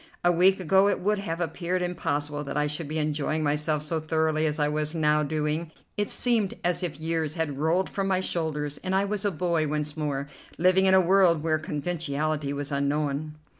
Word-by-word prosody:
A 175 - +5
week 185 +3 +4
ago 190 +3 +4
it - - 0
would 210 +2 +1
have 170 -4 -4
appeared 180 +1 -2
impossible 150 -4 -2
that 140 +1 -4
I 150 - +2
should 150 +1 -3
be 155 +2 -3
enjoying 155 0 -1
myself 150 +1 0
so 160 +1 -1
thoroughly 155 0 +1
as 150 0 -2
I 150 -1 +2
was 150 +1 -1
now 150 -1 +3
doing. 155 +2 -1 0.3
It 205 0 -1
seemed 230 -6 +1
as 175 0 +1
if 170 -4 -3
years 160 -1 -2
had 155 -5 -2
rolled 165 +5 +2
from 195 -1 -2
my 190 -1 +2
shoulders, 150 -5 -2
and 185 0 -1
I 195 +1 +2
was 205 0 -2
a - - +3
boy 170 -2 0
once 150 0 -2
more, 145 -3 -2 0.3
living 185 +2 +4
in 190 - +6
a 190 - +7
world 180 -3 +4
where 155 -1 +1
conventionality 150 -2 -2
was 145 0 -4
unknown. 145 +1 -1
155 Hz, 205 wpm, -26 LUFS, 150-180 Hz, 0.3 s, a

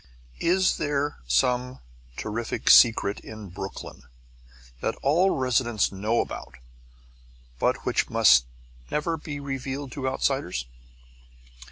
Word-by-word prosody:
Is 185 +2 +2
there 145 0 -1
some 125 - +1 0.4
terrific 110 +2 0
secret 115 -4 +6
in 110 -3 -10
Brooklyn 95 +2 -8 0.8
that - - -2
all 170 +8 +3
residents 125 - +1
know 105 +4 0
about 65 - -7 1.0
but - - 0
which - - 0
must 60 -1 +5 0.4
never 160 +2 -1
be 150 -2 -7
revealed 135 0 -5
to 130 0 -2
outsiders? 130 - -1
125 Hz, 100 wpm, -26 LUFS, 105-145 Hz, 1.0 s, secret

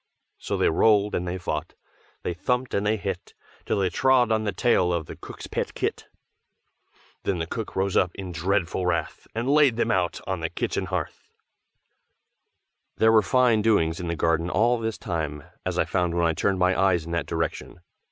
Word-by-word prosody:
So - - -3
they - - +3
rolled 105 +4 +3
and 90 - -1
they 90 +1 -2
fought, 80 -3 -4 0.5
They 90 - -1
thumped 125 +8 -1
and 100 +1 0
they 110 +1 +2
hit. 95 -3 -5 0.3
Till - - +1
they 95 -2 +1
trod 125 +4 +3
on 110 0 +1
the 105 - 0
tail 95 -3 +2
of 85 -2 -1
the - - -9
cook's - - -10
pet - - -3
kit. - - -2 1.1
Then 95 - -1
the 80 - -2
cook 110 +6 -5
rose 95 0 0
up 90 - +4
in 95 -2 -6
dreadful 90 +1 0
wrath, 85 -3 -2
And 115 +2 -2
laid 145 -3 +5
them 120 - +1
out 90 -2 0
on 95 -2 -2
the 80 0 -2
kitchen - - -2
hearth. - - -4 1.7
There 110 0 +5
were 110 -1 +6
fine 120 +2 +3
doings 85 -7 +2
in 90 - -4
the 85 - -1
garden 85 +1 +1
all 120 +5 +2
this 110 -1 -3
time, 80 -7 -4 0.2
as - - -2
I - - +2
found 90 -2 0
when 85 -1 +2
I 80 - +2
turned 95 +3 0
my 90 0 +3
eyes 95 -4 +2
in 85 - -7
that 85 -4 -1
direction. - - -3
95 Hz, 195 wpm, -25 LUFS, 85-110 Hz, 1.7 s, were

